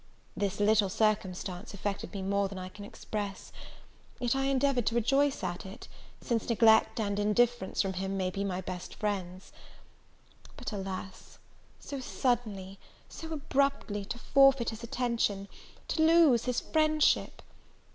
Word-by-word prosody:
This 200 0 -2
little 205 -1 +4
circumstance 195 -2 -1
affected 200 0 -4
me 195 -2 -5
more 200 +1 +1
than 195 0 -8
I 185 0 -6
can 205 +2 -10
express; 205 -1 -6 0.7
yet 245 0 0
I 270 0 0
endeavoured 270 -3 +1
to 230 - +1
rejoice 275 +4 +2
at 175 0 -3
it, 195 +5 -10 0.3
since 230 -1 -1
neglect 225 0 +4
and 205 -2 -1
indifference 220 0 +1
from 190 -1 -2
him 190 +1 -3
may 185 -1 -1
be 195 +2 -3
my 190 -2 -2
best 180 -1 -7
friends. 190 -3 -4 1.1
But, - - -5
alas! 190 -2 -6 0.4
so 280 - -6
suddenly, 215 -7 -2 0.3
so 325 0 -8
abruptly 275 -8 0
to 240 - -5
forfeit 275 -1 +4
his 220 0 -8
attention! 235 -5 -1 0.4
to 315 - 0
lose 315 -7 +5
his 250 -1 0
friendship! 310 -1 +2
210 Hz, 140 wpm, -30 LUFS, 195-250 Hz, 1.1 s, lose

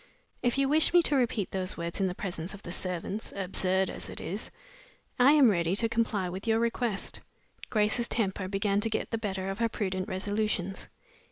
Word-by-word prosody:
If 245 +1 +1
you 275 0 +3
wish 310 +4 +4
me 350 - +8
to 295 - +1
repeat 235 -6 +1
those 185 -1 -2
words 170 +3 -3
in 190 - +3
the 180 - -3
presence 180 -1 -4
of 200 - -13
the 175 - -6
servants 185 +4 -3
(absurd 190 0 +1
as - - -6
it - - -7
is), - - -4 0.7
I 265 +4 +7
am 275 -7 +7
ready 170 -1 +1
to 230 +3 +2
comply 225 -4 0
with 185 +5 -6
your 225 0 +4
request." 230 -2 -1 0.5
Grace's 220 +2 +2
temper 195 -4 -1
began 200 +1 +1
to 225 - 0
get 220 - -2
the 225 - -1
better 190 -3 -3
of 195 - -6
her 230 -1 +2
prudent 190 -4 -2
resolutions. 205 -1 -1
200 Hz, 195 wpm, -29 LUFS, 185-230 Hz, 0.7 s, me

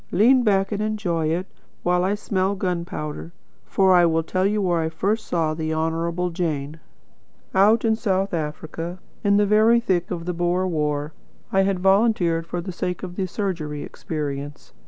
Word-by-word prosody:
Lean 240 +8 +5
back 195 -3 +2
and 205 0 -2
enjoy 195 -7 -1
it, 170 +4 -1 0.4
while 180 0 +2
I 195 +2 +1
smell 195 -1 -1
gun 180 -3 -2
powder. 150 +1 -6 0.3
For 190 -1 +4
I 175 -1 +6
will 165 0 +1
tell 185 +4 0
you 210 +1 0
where 175 -4 +1
I 160 - -1
first 205 +7 -1
saw 160 -3 0
the 160 0 -2
Honourable 165 +2 -1
Jane. 160 -3 -3 0.7
Out 210 +4 +4
in 220 -1 +3
South 195 -4 0
Africa, 165 +2 -4 0.3
in 200 -1 +4
the 205 - +4
very 215 +3 +5
thick 185 -7 0
of 170 -2 -4
the 180 - -2
Boer 175 +2 0
war. 150 -2 -1 0.4
I 195 - +4
had 195 0 +1
volunteered 190 -4 +3
for 175 0 -3
the 185 +2 -6
sake 180 +1 -4
of 180 -1 -6
the 190 -1 -1
surgery 170 -7 -3
experience. 145 -2 -6
180 Hz, 180 wpm, -23 LUFS, 165-195 Hz, 0.7 s, I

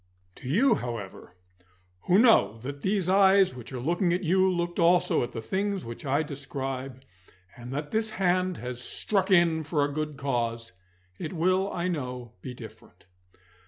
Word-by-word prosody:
To 130 - -8
you, 230 - +4
however, 115 - -6 0.7
who 180 - +4
know 225 - +5
that 140 +2 -6
these 190 -2 0
eyes 195 -2 +5
which 120 -2 -10
are 130 - -5
looking 170 +7 0
at 180 +2 -1
you 185 +2 +3
looked 175 -1 -2
also 175 +1 +3
at 120 - -3
the 115 - -6
things 195 - -2
which 115 +5 -8
I 140 +4 +2
describe, 135 -2 -6 0.5
and 120 +1 -9
that 145 +2 -4
this 220 0 0
hand 185 -3 0
has 125 0 -6
struck 195 +7 -1
in 170 -4 +4
for 150 -1 0
a 145 - -4
good 150 -1 -3
cause, 115 -5 -2 0.5
it 155 - -5
will, 185 +3 +1
I 175 0 -2
know, 125 -8 -4
be 125 - -7
different. 110 -7 -13
155 Hz, 165 wpm, -27 LUFS, 125-185 Hz, 0.7 s, know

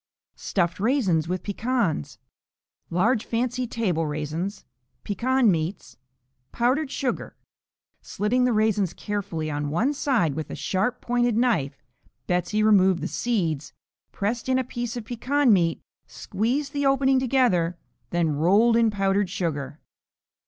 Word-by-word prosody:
Stuffed 175 -2 -1
Raisins 200 - +1
with 185 +1 -3
Pecans 210 - -1 0.7
Large 215 +7 +2
fancy 245 +2 -2
table 180 -9 -1
raisins. 155 +7 -4 0.4
Pecan 240 +3 +2
meats. 165 +3 -3 0.6
Powdered 260 +5 +1
sugar. 265 -2 -3 0.7
Slitting 235 +5 0
the 250 - +3
raisins 215 -4 +1
carefully 185 -7 -3
on 145 0 -2
one 220 - +1
side 260 - +1
with 155 +2 -5
a - - -5
sharp 205 +6 -1
pointed 240 -2 +1
knife, 155 - 0 0.4
Betsey 180 +4 0
removed 190 -4 +4
the 170 - -2
seeds, 170 - -2 0.4
pressed 225 +5 -2
in 260 - +3
a 260 - +1
piece 240 -1 -5
of 230 - -6
pecan 250 +2 +2
meat, 170 -4 +2 0.3
squeezed 225 - -2
the 285 0 -1
opening 270 -1 +3
together, 230 -10 +2 0.3
then 170 -2 +1
rolled 195 +10 +3
in 230 -1 +4
powdered 195 -1 0
sugar. 155 -5 -3
210 Hz, 130 wpm, -25 LUFS, 170-245 Hz, 0.7 s, removed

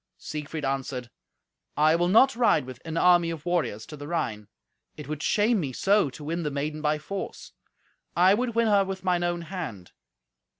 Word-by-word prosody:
Siegfried 150 0 -5
answered, 130 -3 -3 0.7
"I 155 +2 +5
will 175 +1 +2
not 245 +8 +5
ride 235 - +3
with 130 -1 -10
an 165 0 -4
army 175 -1 +5
of 165 -2 -6
warriors 165 -12 -1
to 150 - -9
the 145 0 -9
Rhine; 110 -11 -3 0.5
it - - -8
would 155 0 -4
shame 215 +5 +2
me 140 -7 -3
so 200 +1 +2
to 135 +4 -11
win 165 +3 -2
the 150 - -1
maiden 150 +2 -3
by 150 0 +1
force. 190 +6 -6 0.6
I 185 +3 +6
would 235 +2 -1
win 230 0 +3
her 205 -2 +4
with 190 -1 -5
mine 180 -2 +1
own 175 0 -1
hand. 155 - -7
165 Hz, 185 wpm, -26 LUFS, 145-190 Hz, 0.7 s, I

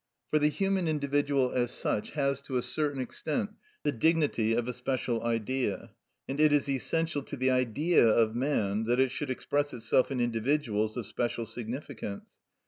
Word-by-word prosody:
For 155 - +4
the 150 - +4
human 190 +2 0
individual 140 -3 +1
as 120 -1 +1
such 105 - -2
has 140 -2 0
to 135 -2 -3
a 125 - 0
certain 145 -3 -1
extent 150 - -2 0.3
the 145 - +2
dignity 145 -5 +2
of 120 0 0
a 125 - -2
special 125 -2 -1
Idea, 115 -2 -1 0.4
and 135 +2 -4
it 155 -1 +6
is 145 -1 +3
essential 150 +3 0
to 140 - -7
the 130 +1 +2
Idea 130 +4 +3
of 110 0 +3
man 110 -5 0
that 120 +2 +2
it 130 -1 +3
should 145 - -4
express 145 +2 -1
itself 120 +2 +2
in 135 -2 -2
individuals 115 -2 0
of 120 - -3
special 115 +2 -2
significance. 115 -1 -6
130 Hz, 170 wpm, -29 LUFS, 115-145 Hz, 0.4 s, it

